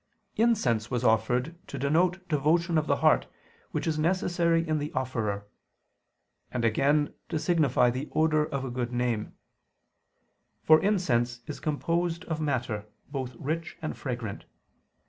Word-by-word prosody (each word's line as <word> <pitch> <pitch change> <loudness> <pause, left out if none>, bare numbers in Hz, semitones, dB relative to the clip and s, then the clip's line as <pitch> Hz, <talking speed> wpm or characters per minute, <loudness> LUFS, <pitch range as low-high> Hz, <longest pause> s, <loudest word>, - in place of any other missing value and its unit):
Incense 135 - +2
was 125 -1 -1
offered 125 +7 +2
to 140 - -6
denote 175 +7 +1
devotion 160 +2 +2
of 155 - -3
the - - +3
heart, - - +4 0.4
which - - -3
is 155 -1 0
necessary 170 -1 +1
in 155 -1 +1
the 145 +1 -4
offerer; 115 -6 -2 1.1
and 120 -2 -1
again, 145 +6 +2 0.2
to 165 - -1
signify 150 -7 +3
the 130 +4 -4
odor 155 -1 +3
of 140 -3 -3
a 130 - -4
good 120 -1 -2
name: 120 -3 -1 1.3
for 155 0 +6
incense 125 - +1
is 150 - -6
composed 165 +2 -1
of 160 -1 -3
matter, 120 -8 -2 0.2
both 130 -3 -4
rich 160 +7 -4
and 155 -3 -4
fragrant. 120 -6 -5
145 Hz, 140 wpm, -28 LUFS, 125-165 Hz, 1.3 s, for